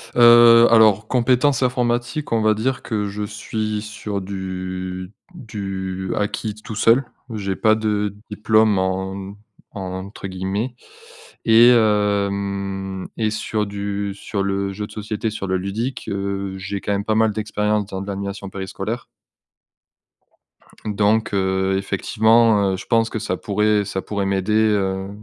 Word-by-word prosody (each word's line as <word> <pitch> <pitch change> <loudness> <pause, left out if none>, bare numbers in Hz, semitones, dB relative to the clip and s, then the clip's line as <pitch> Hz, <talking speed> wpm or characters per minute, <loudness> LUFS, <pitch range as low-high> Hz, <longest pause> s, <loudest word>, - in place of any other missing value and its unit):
Heu, 120 -1 +8
alors, 110 -2 +5
compétences 130 +3 +2
informatiques, 125 +3 -1
on 115 - +2
va 110 0 +4
dire 125 +5 -1
que 105 -3 -2
je 105 +1 -4
suis 110 0 -3
sur 105 -1 -5
du 95 -1 -5 0.2
du 95 - -5
acquis 105 +1 -2
t 105 - -16
tout 110 - -7
seul. 115 +5 +4 0.3
J'ai 100 -3 -2
pas 110 -1 +3
de 105 -2 -1 0.2
«diplôme» 110 0 +3
en 95 +1 -3 0.4
entre 95 0 -6
guillemets 95 +6 -3 0.7
et 115 +1 +7
hem 100 -3 0
et 110 -1 +1
sur 110 -1 -2
du 100 0 -3
sur 100 0 -3
le 100 0 -1
jeu 105 +1 -4
de - - -16
société, 105 +1 -3
sur 100 -2 -5
le 95 - +1
ludique, 105 +8 -4
heu, 100 -1 -3
j'ai 95 +1 -5
quand 105 - -3
même 100 +1 -1
pas 110 - +1
mal 110 0 +3
d'expérience, 105 -1 -1
dans 95 -1 -5
de 100 - -7
l'animation 100 0 -5
périscolaire. 100 +4 -5 1.8
Donc, 105 +1 +1
heu, 95 0 +1
effectivement, 105 +1 +3
heu, - - -2
je - - -9
pense 115 -1 +2
que 110 - -4
ça 110 - -2
pourrait 105 0 +1
ça 95 -1 -3
pourrait 100 -1 -3
m'aider, 95 +1 0
heu, 100 -3 +1
105 Hz, 145 wpm, -21 LUFS, 95-110 Hz, 1.8 s, Heu